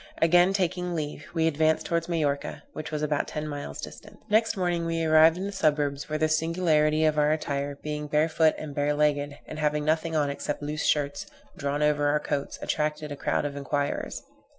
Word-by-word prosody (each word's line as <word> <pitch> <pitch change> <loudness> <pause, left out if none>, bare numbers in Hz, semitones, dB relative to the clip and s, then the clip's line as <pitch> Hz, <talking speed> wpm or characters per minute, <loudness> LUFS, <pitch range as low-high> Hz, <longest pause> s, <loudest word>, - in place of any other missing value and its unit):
Again 175 +3 +5
taking 180 -2 -1
leave, 150 -2 -4
we 160 -1 +2
advanced 160 0 +2
towards 170 0 -1
Majorca, 145 -4 -1
which 155 0 -6
was 150 -1 -3
about 150 -1 0
ten 150 0 -4
miles 145 - -6
distant. - - -9
Next 225 0 +3
morning 175 -2 0
we 165 0 -1
arrived 160 +1 +6
in 190 - -3
the 200 - -3
suburbs, 145 -6 0
where 155 - -1
the 155 +1 +2
singularity 155 -1 +2
of 155 -1 +2
our 150 0 +3
attire, 145 -2 -2
being 150 0 -4
barefoot 155 +1 +3
and 155 -2 -6
bare 145 +1 0
legged, 145 -1 +1
and 155 - -7
having 150 0 0
nothing 160 +1 0
on 145 -2 +1
except 145 +1 -4
loose 150 +1 -2
shirts, 145 -1 0 0.3
drawn 145 -1 -1
over 145 -1 +2
our 150 +1 +2
coats, 145 -2 -3
attracted 150 0 -2
a - - -3
crowd 145 - -1
of 145 -1 -3
enquirers. 145 0 -2
150 Hz, 195 wpm, -27 LUFS, 145-160 Hz, 0.3 s, arrived